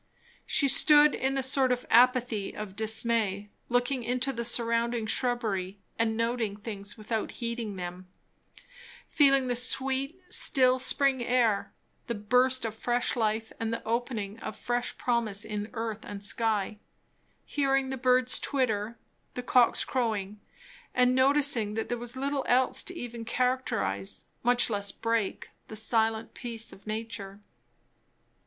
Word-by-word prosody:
She 280 - +2
stood 295 +2 +6
in 270 +1 -1
a 270 - 0
sort 265 0 +2
of 250 0 -1
apathy 245 -3 +3
of 210 -2 -7
dismay, 220 -2 +1 0.2
looking 245 +1 0
into 255 +3 -1
the 235 -1 -4
surrounding 235 0 0
shrubbery 220 -6 -1 0.2
and 220 -1 +1
noting 230 -3 -1
things 205 -1 -5
without 220 0 -4
heeding 235 -3 -4
them; 180 0 -7 1.0
feeling 275 -3 +3
the 245 -1 -1
sweet, 270 +6 +3
still 255 -1 +4
spring 265 -1 +2
air, 235 -4 +1 0.4
the 235 - -2
burst 250 +4 +2
of 220 - -3
fresh 240 +3 -1
life 220 -1 -1
and 225 0 -2
the 230 - -4
opening 225 -3 -3
of 215 - -6
fresh 245 0 -3
promise 230 -5 0
in 210 0 -5
earth 225 -2 -4
and 205 0 -6
sky; 210 -1 0 0.7
hearing 270 -2 0
the - - -2
birds 255 0 +2
twitter, 230 -5 -1 0.4
the 250 - -4
cocks 245 -1 +3
crowing, 215 -5 -2 0.6
and 250 0 +4
noticing 260 -5 +3
that 225 - -3
there 240 - -1
was 240 +1 -5
little 275 +1 -2
else 255 +1 +2
to 360 - -6
even 240 -6 -7
characterize, 230 - -1 0.2
much 245 +1 +3
less 200 -2 0
break, 230 -3 -2 0.2
the 220 - -9
silent 220 0 0
peace 230 -2 -4
of 195 - -17
nature. 215 -2 -5
235 Hz, 140 wpm, -28 LUFS, 215-255 Hz, 1.0 s, stood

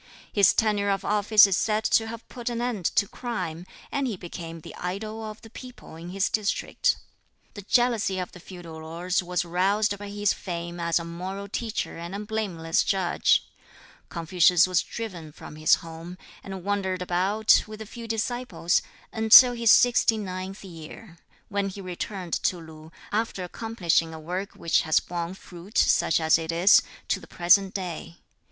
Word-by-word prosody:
His 200 -2 +5
tenure 210 -2 +1
of 195 -1 -1
office 210 +1 +6
is 195 -2 +1
said 215 +2 0
to 225 +1 +2
have 230 0 -8
put 240 -1 -5
an 235 -1 -3
end 240 -7 -3
to 200 - +3
crime, 185 -9 -5 0.2
and 275 -1 -1
he 220 -6 -3
became 165 -2 -8
the - - -10
"idol 215 +5 -5
of 215 0 -7
the 225 - -12
people" 250 -9 -11
in 165 +2 -9
his 195 +2 0
district. 215 - 0 0.6
The 205 - -8
jealousy 225 -2 +1
of 180 -1 -4
the 180 - -13
feudal 170 -3 -10
lords 170 +4 -2
was 180 0 -2
roused 200 +4 +1
by 205 0 -7
his 205 0 0
fame 175 -1 -6
as 170 0 +1
a 170 - -3
moral 185 +4 -6
teacher 220 -4 -4
and 170 +3 -6
a - - -4
blameless 200 -7 -1
judge. 190 -3 +1 0.6
Confucius 175 +1 +4
was 185 -1 +2
driven 180 -9 -7
from 150 - -11
his 155 0 +4
home, 165 +2 -9 0.3
and 190 -2 -7
wandered 190 -2 -1
about, 190 +5 +3
with 215 0 -9
a 220 - -7
few 230 +2 -9
disciples, 225 -6 -1 0.3
until 225 +3 +8
his 235 -1 +1
sixty 240 -1 +5
ninth 190 -1 -6
year, 170 +1 -11 0.3
when 200 -1 -1
he 195 - -9
returned 185 -1 -6
to 180 - +1
Lu, 160 -1 -13 0.2
after 215 -3 -1
accomplishing 175 -5 -1
a - - -8
work 180 +5 -5
which 165 - +1
has 160 -1 +3
borne 175 +1 -5
fruit, 180 +2 -10
such - - +3
as 160 0 +3
it 160 0 -3
is, 175 +5 +6 0.3
to - - 0
the - - -14
present 190 +2 +3
day. 175 -3 -5
190 Hz, 175 wpm, -26 LUFS, 170-215 Hz, 0.6 s, until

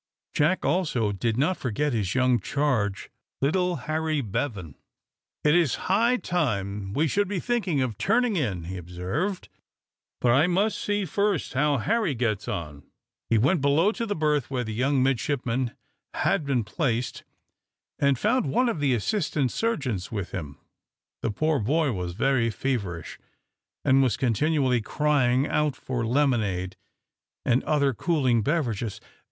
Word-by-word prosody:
Jack, 160 +6 +2
also, 140 - +1
did 110 +3 -1
not 155 +7 +1
forget 135 +4 -1
his 105 -3 -1
young 125 -2 +3
charge, 110 -5 -1 0.3
little 180 +5 +1
Harry 155 -1 0
Bevan. 105 - -3 0.7
"It 150 - +4
is 170 -6 +3
high 230 +6 +3
time 105 - -2
we 155 +7 +2
should 205 +6 +1
be 195 -1 -2
thinking 190 - 0
of 115 -6 -4
turning 235 +1 +2
in," 105 - -1
he 90 +3 -6
observed. 90 - -3 0.7
"But 120 - +3
I 140 +7 +4
must 195 +5 +1
see 205 -1 0
first 200 0 0
how 145 +2 +2
Harry 210 - 0
gets 110 -4 -1
on." 75 -4 -5 0.5
He 115 - +4
went 140 - +3
below 150 +8 +3
to 230 0 -4
the 205 - -1
berth 150 -4 +1
where 130 -2 -1
the 110 -2 -5
young 130 +3 +2
midshipman 130 -1 -1 0.4
had 145 - +1
been 130 -4 +1
placed, 120 +1 -2 0.8
and 140 -2 +3
found 225 - +1
one 240 - +2
of 200 - -2
the 140 -3 +2
assistant 145 - 0
surgeons 130 - -2
with 100 -5 -4
him. 75 -7 -6 0.6
The - - -1
poor 155 +7 +1
boy 145 +6 +1
was 90 -4 -3
very 125 +2 +2
feverish, 100 -9 -3 0.7
and 135 +1 +5
was 130 -4 +2
continually 130 0 +1
crying 135 0 +2
out 150 -3 +1
for 130 -3 -3
lemonade, 110 -8 0 0.7
and 125 +2 +2
other 140 -3 +2
cooling 130 -4 +1
beverages. 120 - -1
135 Hz, 145 wpm, -26 LUFS, 110-160 Hz, 0.8 s, and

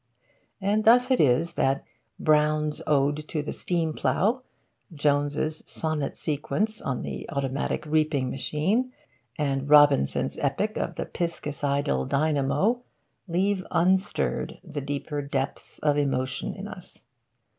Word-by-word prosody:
And 205 +2 +1
thus 245 +3 +5
it 255 - +4
is 145 +5 +3
that 135 +1 +1 0.4
Brown's 150 0 +2
Ode 145 +1 +1
to 155 -3 -2
the 150 - -4
Steam 165 -3 -1
Plough, 225 - +1 0.5
Jones' 145 +1 0
Sonnet 155 -3 -2
Sequence 205 +9 -2
on 125 -3 -2
the - - -6
Automatic 140 0 -2
Reaping 150 -4 +1
Machine, 195 - 0 0.4
and 140 -2 -1
Robinson's 145 - +4
Epic - - 0
of - - -2
the - - -3
Piscicidal 140 - -1
Dynamo, 155 - +1 0.5
leave 190 +2 +1
unstirred 185 +3 +1
the 155 -5 -5
deeper 145 +1 -3
depths 140 0 -4
of 145 -1 +2
emotion 130 -2 -1
in - - -6
us. - - -12
150 Hz, 120 wpm, -26 LUFS, 140-170 Hz, 0.5 s, thus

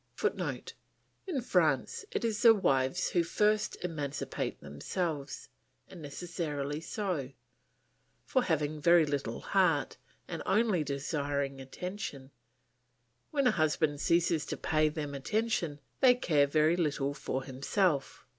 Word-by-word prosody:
[Footnote: - - -2 0.5
In 305 -9 -1
France 170 - +1
it 235 - -2
is 220 -1 -1
the 230 -2 +8
wives 135 -3 +1
who 175 - +3
first 210 +5 +1
emancipate 150 -5 -3
themselves; 140 - -4 0.4
and 180 - -11
necessarily 150 -2 -4
so, 170 - -3 0.9
for 255 - +2
having 155 -2 -1
very 170 0 +6
little 140 -6 -3
heart, 180 -7 +2 0.3
and - - -5
only 210 -6 +2
desiring 140 -1 -2
attention, 140 -1 -6 1.0
when 280 -3 0
a 245 - +6
husband 155 -2 +1
ceases 170 -2 +2
to - - -3
pay 155 -1 +2
them 150 -2 -5
attention 170 0 -1 0.2
they 255 -2 +6
care 150 - +2
very 155 +3 +3
little 145 -5 0
for 140 -2 -3
himself. 140 +4 -1
155 Hz, 120 wpm, -31 LUFS, 140-185 Hz, 1.0 s, the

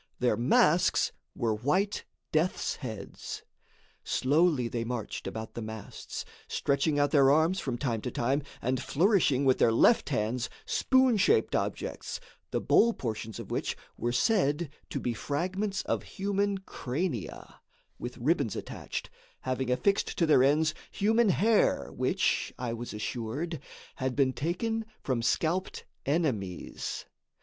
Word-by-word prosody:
Their 125 -1 +2
masks 150 +8 +3 0.2
were 115 -2 0
white 180 - 0 0.3
death's 160 +4 0
heads. 110 -7 -7 0.6
Slowly 145 -2 +2
they 115 0 -2
marched 115 -2 -4
about 110 0 -5
the 120 - -5
masts, 110 -1 -7 0.2
stretching 140 +2 +1
out 145 0 +3
their 140 -3 +6
arms 160 +6 +3
from 130 -6 -2
time 115 -4 -1
to 125 - -3
time 130 +4 0 0.2
and 125 0 0
flourishing 150 - +3
with 130 -1 +4
their 115 - +5
left 190 - +4
hands 120 -1 -1 0.2
spoon 260 -3 +3
shaped 435 - +3
objects, - - -3 0.3
the - - 0
bowl 235 +1 +4
portions 110 - -4
of - - -8
which - - -1 0.2
were 120 - -1
said 160 - +2 0.2
to 140 - -2
be 120 -2 -1
fragments 185 - -2
of - - -1
human 200 0 -1
crania, 140 - -4 0.4
with 120 0 -6
ribbons 135 - +1
attached, - - -5 0.3
having 130 0 -2
affixed 195 +11 +1
to 170 - +3
their 155 -5 +5
ends 155 +3 +3 0.2
human 220 +2 +3
hair, 190 - +3
which, - - +1
I 120 -2 -3
was 120 +1 -5
assured, 120 +9 -3 0.4
had 130 -2 -1
been 135 -2 +3
taken 225 - -1 0.2
from 130 -4 0
scalped 170 +9 0 0.2
enemies. 125 - -2
140 Hz, 135 wpm, -29 LUFS, 120-180 Hz, 0.6 s, their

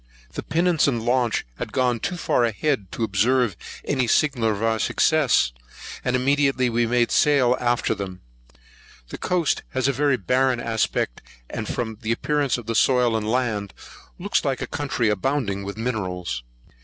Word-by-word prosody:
The - - -4
pinnace 170 -2 +2
and 120 -5 0
launch 120 -1 +1
had - - -5
gone 125 -2 +1
too 180 - -3
far 125 - +1
ahead 115 -2 -1
to 115 - -2
observe 110 +1 +2 0.3
any 130 -4 0
signal 125 -5 +2
of 105 0 -2
our 110 0 +1
success; 150 - +2 0.5
and 125 - 0
immediately 135 -1 +2
we 120 0 +1
made 120 0 +2
sail 135 -4 +4
after 120 -1 +1
them. 95 -2 -7 0.9
The - - -7
coast 175 -4 0
has 130 0 +1
a 140 - +2
very 140 0 +2
barren 125 +5 +1
aspect; 110 - -1 0.3
and, 110 -2 -4
from 110 -3 -4
the 110 0 -2
appearance 145 +3 0
of 120 - -8
the 115 - -2
soil 125 -1 +3
and 110 -1 -1
land, 110 -6 -1 0.4
looks - - 0
like - - -1
a - - -2
country 135 -5 -1
abounding 105 -2 -1
with 100 +2 -6
minerals. 90 - -3
120 Hz, 165 wpm, -23 LUFS, 110-135 Hz, 0.9 s, sail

